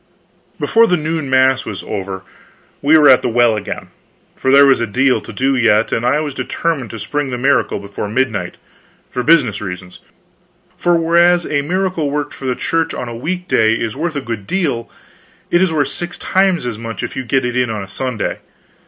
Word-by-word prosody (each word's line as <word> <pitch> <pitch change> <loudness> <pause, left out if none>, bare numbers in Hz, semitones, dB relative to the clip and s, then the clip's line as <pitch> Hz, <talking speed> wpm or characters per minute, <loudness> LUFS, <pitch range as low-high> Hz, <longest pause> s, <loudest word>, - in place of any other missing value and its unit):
Before 230 0 +4
the 180 - +2
noon 155 -2 -3
mass 130 0 +3
was 100 -3 -6
over, 95 -2 -5 0.6
we 150 +3 +5
were 150 -2 +6
at 130 -2 +7
the - - -1
well 120 -1 +3
again; 105 -2 -6 0.5
for 130 - -2
there 140 +1 +7
was 135 -3 +4
a 115 - 0
deal 130 +5 +2
to - - -10
do 135 +1 0
yet, 115 -3 +3
and 115 - -1
I 125 +5 +2
was 150 -2 -4
determined 140 -3 -2
to 115 - -7
spring 140 +7 -3
the 125 - -3
miracle 140 +3 +1
before 100 +1 -6
midnight, 110 -6 -1 0.5
for 125 - -2
business 140 -6 +3
reasons: 90 -2 -7 0.8
for 175 0 +2
whereas 170 +1 +3
a 145 -1 0
miracle 180 -1 -1
worked 145 0 -3
for 135 - -9
the 125 - 0
Church 165 +4 -1
on 125 - -5
a 120 - -6
week 180 +9 -4
day 110 -6 +3
is 115 0 -3
worth 160 +2 -3
a 140 - -2
good 115 -6 -6
deal, 140 -12 -1 0.6
it 175 - +4
is 190 -3 +2
worth 150 -3 0
six 175 0 -4
times 190 -6 +1
as 115 -3 -4
much 115 -1 -6
if - - -5
you 130 - -3
get 130 +1 0
it 125 0 -2
in 125 -2 +1
on 105 -3 -3
a - - -10
Sunday. 125 +2 -3
130 Hz, 205 wpm, -17 LUFS, 115-160 Hz, 0.8 s, at